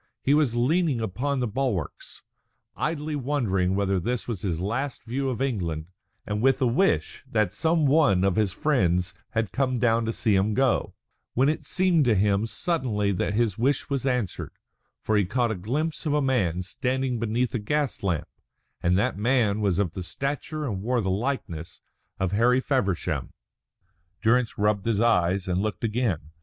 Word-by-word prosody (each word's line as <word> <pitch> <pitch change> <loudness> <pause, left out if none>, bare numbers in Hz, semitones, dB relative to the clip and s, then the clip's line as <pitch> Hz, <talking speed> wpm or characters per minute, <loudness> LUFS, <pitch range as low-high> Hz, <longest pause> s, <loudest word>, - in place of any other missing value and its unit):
He 140 - +3
was 145 -6 +2
leaning 145 +2 +2
upon 125 +6 -2
the 125 - 0
bulwarks, 110 - -3 0.5
idly 155 -1 -2
wondering 115 -10 0
whether 100 -1 +1
this 120 +6 -2
was 115 -6 -3
his 85 -5 -2
last 120 +9 -3
view 130 +3 -2
of 130 +1 -2
England, 85 - -2 0.3
and 105 +1 -2
with 135 +2 +3
a 130 - +2
wish 135 +12 +1
that 105 -4 +1
some 160 +6 +2
one 140 - +4
of 95 -2 +2
his 105 -3 +2
friends 95 - +1 0.2
had 110 -5 0
come 130 -2 0
down 115 -1 +2
to 115 - 0
see 110 -2 +1
him 100 +2 +2
go, 130 -2 +1 0.4
when 130 +4 +4
it 155 - -2
seemed 180 -5 +2
to 115 -3 +3
him 100 +2 +2
suddenly 115 - 0
that 100 +2 -1
his 110 -3 +1
wish 140 +3 0
was 135 -1 0
answered; 125 -7 -2 0.5
for 110 - +1
he 100 - +4
caught 120 +5 0
a - - -1
glimpse 150 - -2
of 145 - +1
a - - +3
man 95 -11 +1
standing 130 +4 -1
beneath 115 +2 0
a 120 - 0
gas 145 +6 -1
lamp, 90 -6 -1 0.5
and 90 +1 +2
that 100 0 0
man 110 -3 +2
was 100 -4 +1
of 100 -5 +1
the 95 - -6
stature 145 - -3
and 100 -8 -3
wore 120 +3 0
the 95 -2 -1
likeness 95 - -3 0.4
of 95 -2 0
Harry 120 +5 +3
Feversham. 115 - -1 0.9
Durrance 120 +1 +2
rubbed 105 0 +1
his 110 -3 +1
eyes 95 -4 +2
and 90 +1 0
looked 105 +1 -3
again. 105 - -1
115 Hz, 175 wpm, -26 LUFS, 100-135 Hz, 0.9 s, one